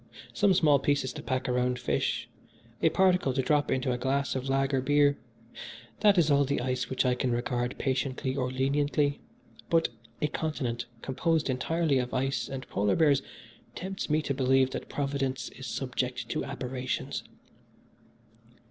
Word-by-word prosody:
Some 200 -3 +3
small 150 -6 +5
pieces 140 -1 0
to 150 - -7
pack 130 -3 -2
around 125 0 +1
fish, 120 - -1 0.5
a - - +5
particle 180 -5 +3
to 135 - +2
drop 145 +2 +2
into 130 -1 0
a 125 - -2
glass 140 +2 0
of 130 0 -3
lager 135 0 +1
beer 145 +1 +4 0.8
that 205 -2 +5
is 160 -3 +4
all 140 0 +5
the 140 +1 0
ice 125 0 -2
which 130 - 0
I 125 - +3
can 125 +1 -1
regard 120 +1 -1
patiently 130 -1 -1
or 125 -2 -1
leniently; 145 +2 +1 0.5
but 165 -1 +3 0.3
a - - +1
continent 130 -6 -2 0.2
composed 150 +2 0
entirely 145 +2 +1
of 125 0 -3
ice 135 +1 -1
and 130 -1 -6
polar 100 0 +1
bears 145 -4 +4 0.5
tempts 190 0 -4
me 155 +1 +2
to 140 - -1
believe 130 0 +3
that - - -5
Providence 140 -3 -2
is 130 0 -9
subject 125 -1 -3
to - - -1
aberrations. 130 0 -3
135 Hz, 155 wpm, -29 LUFS, 130-145 Hz, 0.8 s, small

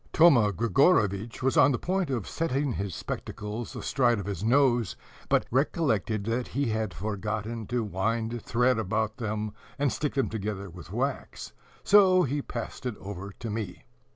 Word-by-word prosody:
Thoma 130 -11 +6
Grigorovitch 115 - +2
was 130 - +2
on 140 - +7
the 125 - +1
point 185 +1 -1
of 120 -7 -2
setting 145 -4 -1
his 100 -3 -3
spectacles 105 +3 -5
astride 120 -4 +2
of 100 - -4
his 100 -2 -4
nose, 120 -2 +3 0.3
but - - +3
recollected 115 - +1
that 115 +3 -1
he 140 -2 -1
had 110 -2 -1
forgotten 105 +2 -4
to 120 -1 0
wind 110 +4 -1
thread 120 +2 +2
about 110 +2 -1
them, 110 -3 -3 0.2
and 140 -2 +1
stick 150 -2 -2
them 135 - +2
together 100 -3 -4
with 85 -1 -11
wax, - - -3 0.3
so 190 -3 +6
he 145 0 -1
passed 125 +1 -6
it 120 - -3
over 100 0 -7
to 115 +1 -6
me. 105 -4 -5
115 Hz, 160 wpm, -28 LUFS, 105-135 Hz, 0.3 s, on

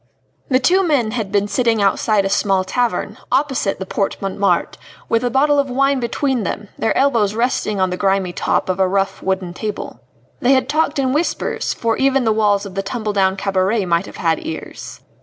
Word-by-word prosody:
The 255 - +4
two 350 +9 +3
men 285 -11 +1
had 215 -4 -3
been 205 0 +1
sitting 225 +2 +1
outside 200 +1 +2
a - - 0
small 195 -1 +1
tavern, 215 -1 -2
opposite 265 -8 +1
the 190 - -5
Porte 195 +1 -2
Montmartre, 195 0 0 0.3
with 230 +1 +1
a 245 - +1
bottle 285 +3 +3
of 275 -1 0
wine 275 +2 +2
between 255 +1 -1
them, 205 +2 -4
their 225 - 0
elbows 230 -7 +2
resting 230 -3 0
on 185 -1 +1
the 180 - -3
grimy 195 -1 0
top - - 0
of 185 0 -1
a 190 - +3
rough 195 0 -1
wooden 190 -2 -2
table. 210 +2 -5 0.4
They 255 +2 +3
had 260 - +2
talked 310 -1 0
in 265 -2 +1
whispers, 315 +4 -1
for 230 -1 -1
even 270 -1 +2
the 220 -2 +2
walls 205 -2 +2
of 195 - -8
the 195 - -1
tumble 215 +1 -3
down 190 -1 +2
cabaret 195 +2 0
might 170 -1 0
have - - -11
had 165 -1 0
ears. 160 - -7
215 Hz, 200 wpm, -19 LUFS, 195-255 Hz, 0.4 s, The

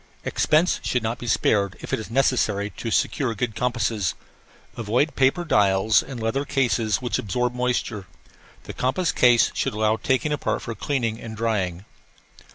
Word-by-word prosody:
Expense 160 +4 +2
should 125 -2 0
not 115 +2 -2
be 120 - -7
spared 100 -4 +1
if - - -7
it - - +1
is 110 - -7
necessary 110 -5 +1
to 115 - -5
secure 115 +2 0
good 110 +2 -2
compasses. 115 -6 -1 0.6
Avoid 120 +7 0
paper 135 +6 +2
dials 100 -5 +3
and 130 -3 -8
leather 115 +5 -1
cases 125 -5 0
which 120 - -1
absorb 125 +4 -1
moisture. 125 -5 -2 0.6
The - - -8
compass 135 +8 0
case 120 -2 +4
should - - -1
allow 110 +1 +1
taking 130 +6 0
apart 145 - -2
for 115 - -4
cleaning 115 -3 -2
and 110 -1 -8
drying. 100 -5 -1
115 Hz, 160 wpm, -23 LUFS, 110-130 Hz, 0.6 s, case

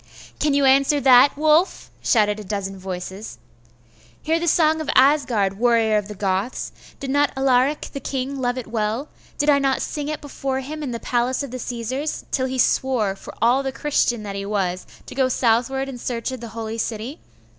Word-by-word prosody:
'Can 295 -2 +2
you 280 -1 +3
answer 275 +2 +4
that, 265 +1 +6
Wulf?' 310 +4 +2
shouted 210 -2 +2
a - - -7
dozen 195 -1 -4
voices. 190 +2 -6 0.9
'Hear 325 +1 +1
the 345 - -2
song 315 -1 +3
of 310 - -5
Asgard, 245 -8 +3
warriors 225 -3 +3
of 200 - -13
the 210 - -8
Goths! 195 +4 -2 0.3
Did 270 -1 -4
not 285 +1 +2
Alaric 265 +2 +2
the 275 - -4
king 270 0 -3
love 245 0 0
it 255 - -4
well? 220 +5 -2 0.3
Did 290 - 0
I 280 - +4
not 270 -1 +1
sing 295 -1 -4
it 305 - -3
before 270 -2 -3
him 305 +4 -6
in 285 - -3
the 235 -1 -4
palace 250 +3 0
of 275 - -7
the 255 - -5
Caesars, 250 +5 -4
till 260 -1 0
he 260 0 -3
swore, 240 -5 +1
for - - -11
all 245 +4 +4
the 270 -1 -3
Christian 260 -5 0
that 200 -1 -5
he 200 - -3
was, 190 -3 -2 0.2
to - - -9
go 260 -1 +1
southward 255 +3 +1
in 260 -3 -7
search 235 +1 -3
of 260 - -6
the 235 - -6
holy 225 0 -4
city? 225 +6 -4
255 Hz, 200 wpm, -22 LUFS, 220-275 Hz, 0.9 s, that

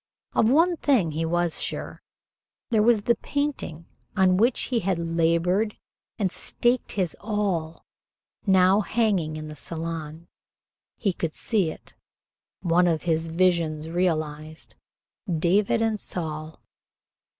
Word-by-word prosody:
Of 225 - +3
one 335 +6 +4
thing 235 - +2
he 160 +2 -2
was 175 0 0
sure. - - -4 0.7
There 220 -2 +4
was 220 -1 +4
the 235 - +4
painting 280 - -3 0.3
on 185 -1 +4
which 235 +5 +2
he 245 -3 0
had 190 -3 0
labored 170 +5 +1 0.4
and 195 -5 0
staked 240 +1 0
his 185 -5 -1
all 195 -7 -2 0.6
now 190 +1 +5
hanging 200 -8 0
in 155 0 -6
the 150 - -8
Salon. 165 +1 -6 0.7
He 200 -5 0
could 165 -2 -3
see 200 -8 +2
it, - - -10 0.7
one 175 0 +3
of 160 -3 0
his 165 -1 0
visions 165 -2 +1
realized, 155 -3 -2 0.6
David 195 +7 +2
and 220 -2 0
Saul. 155 -4 -5
175 Hz, 125 wpm, -25 LUFS, 160-210 Hz, 0.7 s, now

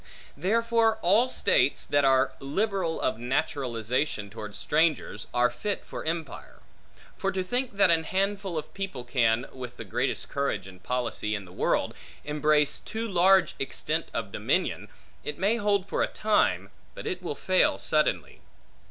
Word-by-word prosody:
Therefore 225 +6 +2
all 210 +8 +5
states 475 - +2
that 145 0 +2
are 135 0 +4
liberal 185 +3 -1
of 110 -3 -1
naturalization 125 -3 -1
towards 105 -1 -7
strangers, 155 -8 0
are 125 0 +3
fit 200 +12 -3
for - - -6
empire. 160 -3 -5 0.6
For 195 - 0
to 185 0 -1
think 245 +4 -2
that 195 - +5
an 165 -1 +2
handful 195 -1 -1
of 155 - -5
people 195 -11 -5
can, 120 -1 +2
with 125 -2 -8
the - - -7
greatest - - -1
courage 140 -9 -2
and 95 -1 -12
policy 115 -1 -2
in 100 -2 -6
the 90 - -14
world, - - 0 0.3
embrace 150 0 +2
too 225 +1 -4
large 190 -1 +4
extent 155 +4 -2
of 110 -3 -4
dominion, - - -1 0.4
it 150 - -4
may 205 +6 +2
hold 205 -3 +1
for - - -1
a - - +3
time, 215 0 +1 0.2
but - - -8
it 180 0 -3
will 170 -5 -4
fail 185 +4 +2
suddenly. 155 0 0
155 Hz, 155 wpm, -27 LUFS, 125-195 Hz, 0.6 s, all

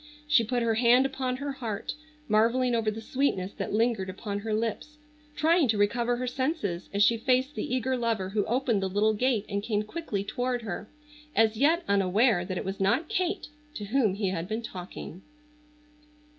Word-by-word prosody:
She 290 -6 +5
put 240 +2 -1
her 230 -1 +2
hand 240 +3 +5
upon 265 -2 -2
her 280 +1 -3
heart, 230 -7 -4 0.3
marvelling 235 +4 +3
over 225 -2 +1
the 220 +1 -5
sweetness 220 -8 -1
that - - -2
lingered 220 -3 +1
upon 200 +2 -4
her 220 +2 -4
lips, 230 +7 -2 0.4
trying 320 -1 +3
to 220 -2 +1
recover 235 +4 +2
her 250 +1 -3
senses 260 - -2
as 200 +1 +3
she 230 +2 +4
faced 255 +4 +1
the 290 -3 -2
eager 260 +1 0
lover 225 -6 -1
who 205 +1 0
opened 235 -3 +1
the 190 - -1
little 210 +3 +2
gate 230 -1 +1
and 200 -1 -2
came 210 -1 -1
quickly 215 -5 -4
toward 245 +3 -2
her, 205 0 -5 0.5
as 225 0 +4
yet 320 +9 +3
unaware 200 +1 +3
that 185 0 -4
it - - -4
was 195 +1 -4
not 200 - +1
Kate 365 -2 -1 0.3
to 210 - -5
whom 220 -3 +2
he 200 -2 -1
had 175 -2 -3
been 220 +3 -3
talking. 180 -2 -8
225 Hz, 185 wpm, -28 LUFS, 205-255 Hz, 0.5 s, She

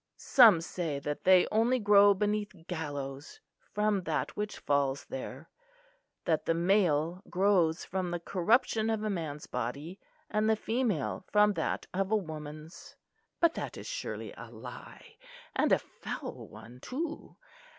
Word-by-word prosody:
Some 225 -11 +6
say 165 -3 -3
that 145 +1 -5
they 185 -1 +7
only 230 +4 +3
grow 205 -2 +6
beneath 205 -3 -2
gallows 145 -4 -5 0.3
from 210 -1 +1
that - - -2
which 210 0 -3
falls 140 -1 0
there; 135 +3 -7 0.8
that 155 -2 +1
the 165 - +2
male 175 -2 +2
grows 180 -4 +2
from 185 -1 -2
the 175 0 -2
corruption 220 +5 +1
of 220 -1 -1
a 215 - 0
man's 155 -5 -4
body; 140 - -5 0.3
and 215 +1 +1
the 220 - +4
female 220 - -1
from 210 0 +5
that - - -2
of 195 +1 0
a 220 - +4
woman's; 155 -3 -8 0.4
but 335 -1 +4
that - - -5
is - - -8
surely - - -5
a - - -10
lie, - - -11 0.4
and - - +2
a - - +6
foul 185 - -7
one, 110 +3 -13
too. 310 - -5
185 Hz, 145 wpm, -30 LUFS, 155-210 Hz, 0.8 s, they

